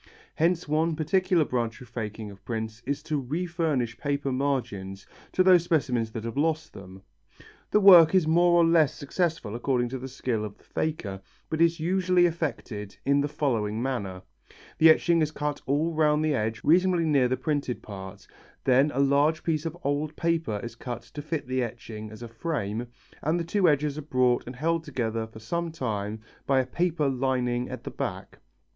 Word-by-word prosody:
Hence 170 +1 +1
one 160 +2 +1
particular 170 +1 +2
branch 120 -3 -2
of 125 - -12
faking 110 -2 -6
of 100 - -14
the - - -40
prints 110 -1 -4
is 145 +1 -2
to 155 -3 -1
refurnish 155 -4 -2
paper 140 -1 -1
margins 120 -8 -2 0.3
to 185 - +3
those 180 -2 +6
specimens 125 -9 0
that 110 - -5
have 115 +3 -5
lost 160 +1 0
them. 95 0 -12 0.7
The 210 - +4
work 180 -3 +9
is 185 -4 +4
more 175 +2 +4
or 170 - +5
less 160 -3 +4
successful 155 - -2
according 120 0 0
to 130 +1 -5
the 130 - -6
skill 125 -4 -2
of 105 -1 -7
the - - -26
faker, 100 -12 -3 0.3
but 160 +1 0
is 170 0 +3
usually 180 +1 +3
effected 140 - -3
in 140 +1 +3
the 145 - 0
following 115 -8 -1
manner: 100 -8 -3 0.6
The 160 - +8
etching 165 +1 +4
is 155 - +2
cut 150 -1 -3
all 150 +5 +1
round 155 -1 +2
the 155 - +2
edge 110 -3 -2
reasonably 175 +1 +3
near 140 -5 +3
the 130 +1 -1
printed 140 -2 -2
part, 95 -1 -9 0.4
then 135 +3 +4
a - - 0
large 140 +3 +3
piece 160 -1 -1
of 165 +1 -6
old 145 +2 -1
paper 165 -11 0
is 120 - -6
cut 120 0 -6
to 145 - -5
fit 155 -1 -3
the 130 +1 -1
etching 110 -2 -6
as 110 +2 -10
a - - -6
frame 115 -3 -3 0.3
and 160 +4 0
the - - -1
two 180 +1 +2
edges 150 0 0
are - - -4
brought 130 -5 +1
and 125 - -7
held 165 +4 0
together 115 -6 -2
for 110 - -14
some 170 +10 -3
time 110 -7 -3 0.3
by 135 -1 +4
a 130 - +1
paper 170 -1 0
lining 125 -2 0
at - - -7
the - - -6
back. - - -5
140 Hz, 190 wpm, -27 LUFS, 115-160 Hz, 0.7 s, work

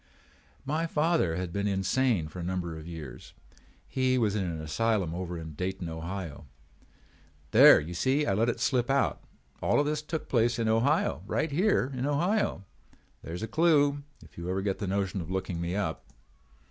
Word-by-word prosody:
"My 155 +4 -1
father 160 - +1
had 90 -1 -4
been 100 0 -1
insane 100 -1 +1
for 90 - -9
a - - -4
number 90 -2 -3
of 80 0 -9
years. 75 -7 -9 0.5
He 130 -1 +1
was 110 -4 +1
in 100 - 0
an 85 -2 -4
asylum 90 +3 0
over 90 0 -4
at 80 -2 -8
Dayton, 90 0 -3
Ohio. 80 -2 -6 1.0
There - - +9
you 80 +4 -6
see 135 - +1
I - - -1
have 100 - +1
let 115 +2 +3
it 120 - -2
slip 125 -2 +1
out! 135 0 +1 0.4
All - - +2
of 145 - +2
this 150 0 -1
took 155 +1 -5
place 120 -1 +2
in 115 -1 0
Ohio, 115 - +2
right 155 - -1
here 165 -4 +2
in 130 +2 -1
Ohio. 175 - 0 0.6
There 80 - -6
is 90 - -5
a - - -2
clew 145 0 +3 0.2
if - - -14
you 85 +1 -5
ever 95 +1 -1
get 100 -1 -1
the 100 - -3
notion 95 0 -1
of 80 - -8
looking 95 -2 -3
me 85 +2 -2
up. 95 -7 -2
100 Hz, 190 wpm, -29 LUFS, 85-135 Hz, 1.0 s, There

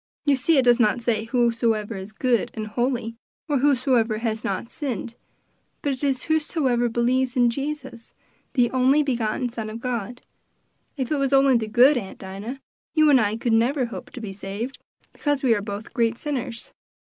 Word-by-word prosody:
You 285 -2 +4
see 280 +5 +2
it 265 - +4
does 245 0 +5
not 220 +1 +3
say 225 -2 0
whosoever 230 -2 +1
is 190 +2 -7
good 240 +1 +1
and 215 -1 -4
holy, 235 +1 -2 0.3
or 290 -4 +1
whosoever 250 -5 +2
has 220 -1 -2
not 195 +4 -2
sinned, 245 - -3 0.7
but 285 - +1
it 260 - -7
is 270 -2 0
whosoever 295 -6 +1
believes 245 +3 +1
in 245 -2 +4
Jesus, 270 -3 -6 0.4
the 245 -4 +2
only 265 +3 +3
begotten 245 -2 -1
Son 225 -2 -5
of 220 +1 -6
God. 245 -1 -4 0.7
If 260 -1 -3
it 300 - +2
was 275 -1 0
only 270 -1 +5
the 225 -2 0
good, 250 +6 +5
Aunt 195 -5 -6
Dinah, 200 +8 -7 0.3
you 310 -1 +5
and 260 -4 +6
I 210 0 0
could 230 0 -1
never 250 +4 +2
hope 235 - -8
to 245 - -7
be 205 -3 -6
saved, 205 +7 -6 0.3
because 290 -2 -1
we 245 -3 +4
are 205 - 0
both 205 +1 -7
great 230 -2 +1
sinners." 250 -5 -4
240 Hz, 180 wpm, -24 LUFS, 225-270 Hz, 0.7 s, and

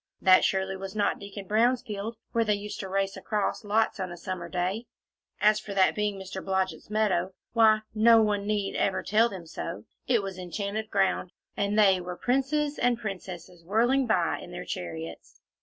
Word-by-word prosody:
That 185 -1 +6
surely 190 0 0
was 190 +1 -7
not 205 -1 +1
Deacon 200 0 -8
Brown's 235 +5 +2
field, 220 0 -5
where 230 - +2
they 210 -2 +2
used 205 +1 -6
to 190 - -5
race 195 0 0
across 210 +1 -2
lots, 215 +2 +1
on 185 -1 -3
a 175 - -7
summer 175 0 -5
day! 185 +6 -2 0.5
And 210 - +6
as 215 - -3
for 205 -2 -7
that 190 -1 +4
being 210 -1 -1
Mr. 190 0 -7
Blodgett's 190 0 -1
meadow 195 -4 +1 0.2
why! 220 -2 +5
no 225 +1 +6
one 205 -2 +1
need 205 -2 -1
ever 190 - 0
tell 220 +4 +3
them 185 -5 -8
so; 165 +1 -6 0.2
it 235 -5 +3
was 190 -1 -6
enchanted 200 +4 -4
ground, 190 -3 +1 0.2
and 200 +1 0
they 195 -3 +5
were 180 0 -6
princes 285 +4 0
and 245 -1 +2
princesses 180 -5 -7
whirling 240 +8 +2
by 180 -6 +1
in - - -10
their - - -7
chariots. 80 -2 -7
200 Hz, 190 wpm, -28 LUFS, 185-220 Hz, 0.5 s, That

